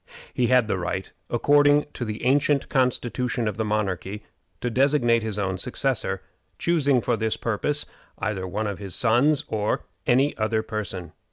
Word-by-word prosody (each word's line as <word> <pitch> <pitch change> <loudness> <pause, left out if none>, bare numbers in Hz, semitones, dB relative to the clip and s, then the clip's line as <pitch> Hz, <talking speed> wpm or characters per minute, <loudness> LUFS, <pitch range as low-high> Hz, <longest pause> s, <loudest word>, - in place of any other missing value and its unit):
He 125 - +1
had 125 -3 +4
the 95 - -1
right, 90 +2 -3 0.2
according 145 +4 +4
to - - -4
the 110 +2 -5
ancient 140 +1 +2
constitution 125 -3 0
of 105 - -3
the 110 - 0
monarchy, 105 -1 -2 0.4
to 120 - -2
designate 125 -2 +3
his 110 -2 -3
own 95 -2 -1
successor, - - -1 0.3
choosing 145 - +2
for 120 - +1
this 110 -1 -1
purpose 140 +7 -1 0.3
either 95 -2 -2
one 105 +4 -2
of 100 -2 -3
his 100 -4 -1
sons 125 +6 +3
or 105 -1 -1 0.2
any 135 +4 +3
other 110 0 0
person. 100 -5 -4
115 Hz, 160 wpm, -25 LUFS, 105-130 Hz, 0.4 s, had